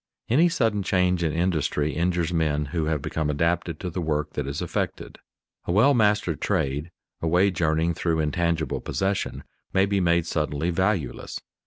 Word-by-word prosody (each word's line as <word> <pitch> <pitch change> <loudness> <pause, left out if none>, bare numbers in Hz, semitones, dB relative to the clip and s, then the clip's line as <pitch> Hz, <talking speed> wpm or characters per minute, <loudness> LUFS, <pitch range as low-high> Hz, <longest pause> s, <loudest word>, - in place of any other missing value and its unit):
_ - - +1
Any 165 +6 +5
sudden 115 - +1
change 90 -2 +1
in 80 - +1
industry 80 -3 0
injures 85 0 0
men 75 -3 +1
who 80 -3 0
have 75 -2 -1
become 80 -2 -2
adapted 85 +1 0
to 90 -2 -4
the 90 - -3
work 75 -2 -1
that 75 -2 -3
is 70 +1 -3
affected. - - -3 0.5
A - - -1
well 115 +10 +5
mastered 105 - +2
trade, 70 +5 -1 0.3
a 80 - -1
wage 90 +2 +2
earning 80 +1 +2
though 85 0 0
intangible 80 -3 0
possession, 95 0 -2 0.3
may 95 +1 +4
be 100 0 0
made 85 -2 +2
suddenly 75 +1 -1
valueless. 95 -3 -1
85 Hz, 170 wpm, -25 LUFS, 80-95 Hz, 0.5 s, Any